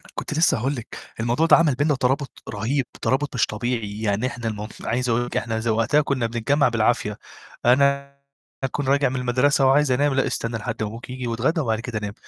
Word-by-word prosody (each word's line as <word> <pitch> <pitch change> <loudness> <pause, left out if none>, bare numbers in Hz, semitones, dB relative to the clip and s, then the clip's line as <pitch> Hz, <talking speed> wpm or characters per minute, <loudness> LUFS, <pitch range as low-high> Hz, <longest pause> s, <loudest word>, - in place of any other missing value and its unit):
كنت - - -4
لسّه 155 -3 +3
هاقول 135 +6 -1
لِك، 120 -4 -8 0.2
الموضوع 120 +7 +1
ده - - +7
عمل 155 -5 +3
بيننا 145 +2 +1
ترابط 135 +1 -1
رهيب، 120 +6 -1 0.2
ترابط 140 +1 0
مش 120 - +3
طبيعي، 105 -1 -3
يعني 105 +3 0
إحنا 120 -2 -5
المُ 105 -1 -4 0.2
عايز 125 +1 -1
أقول 120 +1 +1
لِك 120 - -4
إحنا 115 -1 -2
إذا 110 +1 0
وقتها 115 +7 +3
كنّا 140 -4 -1
بنتجمّع 120 +5 +1
بالعافية، 110 -2 0 0.5
أنا 140 +2 +3 0.5
أكون 135 +1 -2
راجع 140 0 +3
من 130 - -4
المدرسة 130 +3 +2
وعايز 140 +1 +4
أنام 140 +2 +2
"لأ، 135 - +1
استنى 115 0 -2
لحد 110 0 -4
ما 105 - -2
أبوك 115 +4 -10
ييجي 125 -1 -5
واتغدّا 125 +9 0
وبعد 110 -5 0
كده 115 -2 -4
نام." 105 -1 -5
125 Hz, 205 wpm, -23 LUFS, 115-140 Hz, 0.5 s, ده